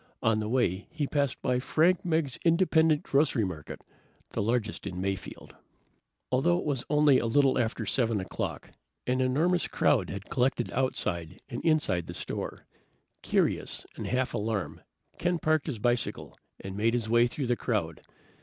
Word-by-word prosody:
On 110 Hz, -1 st, +3 dB
the 105 Hz, 0 st, -3 dB
way 110 Hz, -6 st, 0 dB
he 160 Hz, -3 st, -2 dB
passed 140 Hz, -2 st, 0 dB
by 125 Hz, 0 st, +1 dB
Frank 165 Hz, +7 st, +2 dB
Meggs 160 Hz, -6 st, 0 dB
Independent 165 Hz, -3 st, +3 dB
Grocery 140 Hz, -4 st, +2 dB
Market, 80 Hz, -6 st, -7 dB, 0.5 s
the -, -, -2 dB
largest 110 Hz, 0 st, -1 dB
in 90 Hz, -, -5 dB
Mayfield. 95 Hz, 0 st, -5 dB, 0.8 s
Although 165 Hz, +8 st, +3 dB
it -, -, -4 dB
was 135 Hz, -5 st, -1 dB
only 150 Hz, -3 st, +5 dB
a 115 Hz, -, -1 dB
little 135 Hz, +2 st, +3 dB
after 115 Hz, -1 st, -1 dB
7 115 Hz, 0 st, +1 dB
o'clock, 95 Hz, -, -5 dB, 0.3 s
an 130 Hz, +1 st, +1 dB
enormous 160 Hz, +8 st, +2 dB
crowd 100 Hz, -10 st, +2 dB
had 100 Hz, 0 st, -6 dB
collected 125 Hz, -1 st, 0 dB
outside 90 Hz, -10 st, -1 dB
and -, -, -5 dB
inside 150 Hz, -, +1 dB
the 85 Hz, -, -6 dB
store. -, -, -5 dB, 0.6 s
Curious -, -, 0 dB
and -, -, -5 dB
half 130 Hz, 0 st, 0 dB
alarmed, 105 Hz, -3 st, -2 dB, 0.4 s
Ken 175 Hz, 0 st, +1 dB
parked 155 Hz, -1 st, +1 dB
his 140 Hz, -7 st, -3 dB
bicycle 120 Hz, +1 st, -1 dB, 0.2 s
and 95 Hz, 0 st, -7 dB
made 115 Hz, +3 st, +1 dB
his 115 Hz, -2 st, -1 dB
way 120 Hz, +1 st, +4 dB
through 135 Hz, +3 st, -4 dB
the 120 Hz, 0 st, +1 dB
crowd. 100 Hz, -11 st, -2 dB
125 Hz, 160 wpm, -29 LUFS, 105-150 Hz, 0.8 s, only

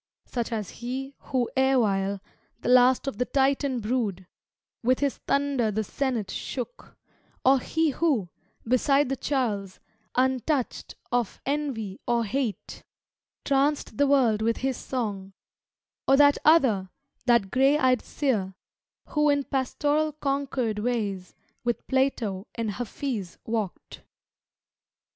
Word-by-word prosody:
Such 240 Hz, -1 st, -3 dB
as 215 Hz, -4 st, -3 dB
he 265 Hz, +3 st, -4 dB
who 250 Hz, -3 st, 0 dB
erewhile 205 Hz, -7 st, +2 dB, 0.4 s
The -, -, -2 dB
last 250 Hz, +1 st, +5 dB
of 270 Hz, -7 st, -4 dB
the 250 Hz, -, +2 dB
Titan 270 Hz, -2 st, +1 dB
brood 210 Hz, -5 st, -1 dB, 0.6 s
With 255 Hz, +2 st, +3 dB
his 280 Hz, -2 st, 0 dB
thunder 275 Hz, -5 st, +1 dB
the 215 Hz, +1 st, -1 dB
Senate 240 Hz, -2 st, -2 dB
shook; -, -, -6 dB, 0.5 s
Or 265 Hz, +1 st, +6 dB
he 320 Hz, +4 st, 0 dB
who, 265 Hz, -, +1 dB, 0.4 s
beside 275 Hz, +3 st, +3 dB
the 270 Hz, -, 0 dB
Charles, 215 Hz, -9 st, -2 dB, 0.4 s
Untoucht 260 Hz, +1 st, 0 dB, 0.2 s
of 245 Hz, -4 st, -1 dB
envy 265 Hz, -9 st, -2 dB
or 235 Hz, -1 st, +2 dB
hate, 230 Hz, 0 st, -3 dB, 0.6 s
Tranced 280 Hz, +1 st, +1 dB
the 285 Hz, 0 st, +4 dB
world 245 Hz, -6 st, +3 dB
with 230 Hz, +1 st, +1 dB
his 265 Hz, -1 st, +1 dB
song; 205 Hz, -8 st, -4 dB, 0.7 s
Or 270 Hz, -, +6 dB
that 285 Hz, 0 st, +6 dB
other, 245 Hz, -, +4 dB, 0.4 s
that 235 Hz, -6 st, +3 dB
gray 270 Hz, +3 st, +4 dB
eyed 255 Hz, -4 st, +3 dB
seer 210 Hz, -10 st, -1 dB, 0.5 s
Who 300 Hz, 0 st, +2 dB
in 285 Hz, -1 st, +2 dB
pastoral 290 Hz, +4 st, 0 dB
Concord 275 Hz, -6 st, -1 dB
ways 210 Hz, -5 st, -2 dB, 0.3 s
With 240 Hz, -1 st, -2 dB
Plato 245 Hz, -7 st, 0 dB
and 230 Hz, -2 st, -2 dB
Hafiz 225 Hz, -3 st, -4 dB
walked. 220 Hz, -5 st, -4 dB
255 Hz, 120 wpm, -26 LUFS, 220-275 Hz, 0.7 s, Or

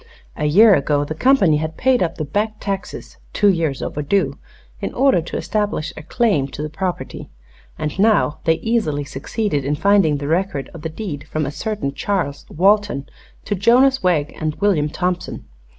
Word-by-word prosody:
A 150 Hz, -, -2 dB
year 205 Hz, +8 st, +6 dB
ago 145 Hz, -2 st, +1 dB
the 155 Hz, -, -4 dB
company 195 Hz, -, +4 dB
had 160 Hz, +1 st, -4 dB
paid 260 Hz, -1 st, +2 dB
up 170 Hz, -2 st, 0 dB
the 155 Hz, -, -3 dB
back 210 Hz, +9 st, -1 dB
taxes 195 Hz, -1 st, -5 dB, 0.2 s
two 205 Hz, -, +4 dB
years 160 Hz, -7 st, 0 dB
overdue 145 Hz, -1 st, -1 dB, 0.4 s
in -, -, -3 dB
order 265 Hz, -9 st, +3 dB
to 165 Hz, -, -5 dB
establish 205 Hz, -7 st, -2 dB
a -, -, -8 dB
claim 170 Hz, -, +1 dB
to 145 Hz, -, -6 dB
the 155 Hz, -, -5 dB
property, 185 Hz, +1 st, -4 dB, 0.5 s
and 155 Hz, +4 st, -4 dB
now 210 Hz, -7 st, +3 dB
they 165 Hz, -, +4 dB
easily 210 Hz, -10 st, -1 dB
succeeded 145 Hz, -, -2 dB
in 145 Hz, +2 st, 0 dB
finding 190 Hz, -3 st, +3 dB
the 140 Hz, 0 st, -5 dB
record 165 Hz, -3 st, -1 dB
of 165 Hz, -, -9 dB
the 160 Hz, -, -4 dB
deed 160 Hz, -4 st, -6 dB
from 155 Hz, -1 st, -2 dB
a 140 Hz, -, -3 dB
certain 155 Hz, -2 st, -3 dB
Charles 170 Hz, -6 st, -2 dB
Walton 195 Hz, -5 st, +2 dB, 0.4 s
to 205 Hz, -, -1 dB
Jonas 250 Hz, +7 st, +4 dB
Wegg 165 Hz, -6 st, +1 dB
and 155 Hz, -1 st, -1 dB
William 180 Hz, -8 st, +1 dB
Thompson. 180 Hz, +2 st, -3 dB
170 Hz, 175 wpm, -20 LUFS, 150-205 Hz, 0.5 s, year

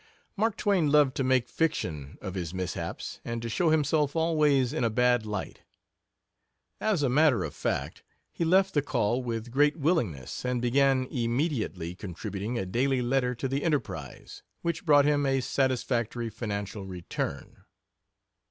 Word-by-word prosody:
Mark 220 Hz, +1 st, 0 dB
Twain 185 Hz, -7 st, +2 dB
loved 145 Hz, -3 st, +5 dB
to 135 Hz, -, +1 dB
make 130 Hz, -2 st, +2 dB
fiction 80 Hz, -, -2 dB
of 95 Hz, -3 st, -4 dB
his 90 Hz, -2 st, -4 dB
mishaps, 90 Hz, -1 st, -4 dB
and 115 Hz, 0 st, -3 dB
to -, -, -3 dB
show 165 Hz, +9 st, +1 dB
himself 150 Hz, -1 st, +2 dB
always 150 Hz, -5 st, +2 dB
in 155 Hz, -, -1 dB
a 115 Hz, -, +3 dB
bad 125 Hz, 0 st, +2 dB
light. 105 Hz, -2 st, -5 dB, 1.2 s
As 205 Hz, -9 st, +1 dB
a -, -, +3 dB
matter 130 Hz, -, +4 dB
of -, -, -5 dB
fact, -, -, -3 dB, 0.3 s
he -, -, -2 dB
left 190 Hz, +3 st, +3 dB
the 145 Hz, -, +3 dB
Call 125 Hz, -3 st, 0 dB
with 115 Hz, -1 st, -4 dB
great 145 Hz, +4 st, +3 dB
willingness, 125 Hz, -, -1 dB
and 125 Hz, -1 st, 0 dB
began 130 Hz, +2 st, +3 dB
immediately 115 Hz, -, -1 dB
contributing 100 Hz, +4 st, -5 dB
a 95 Hz, -, -2 dB
daily 125 Hz, +6 st, +1 dB
letter 125 Hz, 0 st, +1 dB
to 135 Hz, -, -3 dB
the 135 Hz, +2 st, -2 dB
Enterprise, 110 Hz, -, -3 dB, 0.2 s
which 170 Hz, 0 st, -2 dB
brought 145 Hz, -2 st, +6 dB
him 145 Hz, -1 st, +2 dB
a 135 Hz, 0 st, +2 dB
satisfactory 120 Hz, -3 st, -1 dB
financial 100 Hz, -3 st, -4 dB
return. 90 Hz, -2 st, -5 dB
125 Hz, 150 wpm, -28 LUFS, 110-150 Hz, 1.2 s, brought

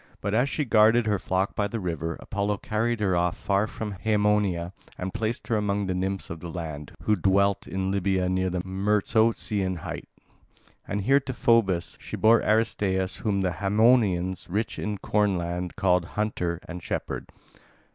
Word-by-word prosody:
But, 100 Hz, +1 st, -2 dB
as 125 Hz, +5 st, +2 dB
she 150 Hz, -, -1 dB
guarded 115 Hz, 0 st, +5 dB
her 105 Hz, -3 st, +1 dB
flock 95 Hz, +2 st, -1 dB
by 105 Hz, -, +1 dB
the 115 Hz, +3 st, -4 dB
river, 85 Hz, -3 st, -3 dB
Apollo 100 Hz, +1 st, -2 dB
carried 115 Hz, +2 st, 0 dB
her 95 Hz, -3 st, +2 dB
off 85 Hz, 0 st, +1 dB
far 100 Hz, +1 st, +1 dB
from 110 Hz, -1 st, -5 dB
Haemonia 105 Hz, -3 st, +1 dB, 0.2 s
and 90 Hz, +1 st, -4 dB
placed 115 Hz, +1 st, -2 dB
her 115 Hz, -, +2 dB
among 105 Hz, -1 st, 0 dB
the 95 Hz, -, -1 dB
nymphs 95 Hz, 0 st, -2 dB
of 85 Hz, -, -6 dB
the 85 Hz, -, -7 dB
land, 80 Hz, -4 st, -6 dB
who 105 Hz, -, +3 dB
dwelt 100 Hz, +1 st, +2 dB
in 95 Hz, 0 st, -2 dB
Libya 95 Hz, -1 st, +1 dB
near 95 Hz, 0 st, 0 dB
the 90 Hz, 0 st, -2 dB
Myrtosian 100 Hz, -1 st, +1 dB
height. -, -, -6 dB, 0.8 s
And 100 Hz, -, -2 dB
here 135 Hz, +8 st, +4 dB
to 135 Hz, -1 st, -5 dB
Phoebus 110 Hz, -8 st, +2 dB
she -, -, -6 dB
bore 115 Hz, +1 st, +5 dB
Aristaeus 100 Hz, -4 st, +1 dB
whom 100 Hz, -3 st, 0 dB
the 95 Hz, -1 st, +1 dB
Haemonians, 100 Hz, -3 st, +3 dB
rich 105 Hz, +5 st, -2 dB
in 105 Hz, -1 st, -2 dB
corn 105 Hz, -1 st, +1 dB
land, 85 Hz, +1 st, -3 dB
call 90 Hz, -2 st, +3 dB
"Hunter" 90 Hz, -2 st, -2 dB
and 90 Hz, 0 st, -7 dB
"Shepherd". -, -, -4 dB
100 Hz, 170 wpm, -26 LUFS, 90-105 Hz, 0.8 s, guarded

